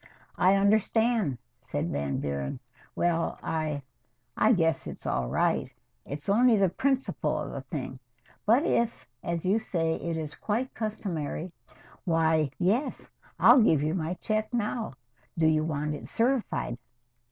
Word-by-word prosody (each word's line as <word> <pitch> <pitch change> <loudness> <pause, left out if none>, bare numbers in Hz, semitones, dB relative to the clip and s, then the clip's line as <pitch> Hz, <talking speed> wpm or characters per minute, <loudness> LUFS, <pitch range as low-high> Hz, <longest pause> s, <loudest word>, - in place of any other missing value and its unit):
"I 185 +2 +5
understand," 215 - +2 0.2
said 85 - -3
Van 70 -1 -1
Buren. 70 -1 -3 0.4
"Well 170 -1 0
I 155 -3 -2 0.5
I 220 - +4
guess 165 -7 +2
it's - - -8
all 65 -1 0
right. - - +1 0.4
It's 145 +1 -6
only 230 +3 +5
the 195 -2 +4
principle 250 - 0
of - - -4
the 140 - -5
thing 130 -1 -6 0.4
but 240 +9 +4
if, 235 -9 0 0.2
as 170 0 -3
you 200 +5 +3
say, 165 -7 -1
it 170 -1 -3
is 155 -2 -4
quite 235 +5 -2
customary 185 -6 -3 0.5
why, 160 -3 +2
yes. 220 +11 0 0.3
I'll 255 - +7
give 160 -9 +4
you 155 +1 0
my 175 -1 -2
check 215 +2 -1
now. 230 - -2 0.4
Do 165 - +3
you 155 -1 +4
want 150 -1 -2
it 150 - -7
certified?" 230 - 0
170 Hz, 140 wpm, -28 LUFS, 155-220 Hz, 0.5 s, I'll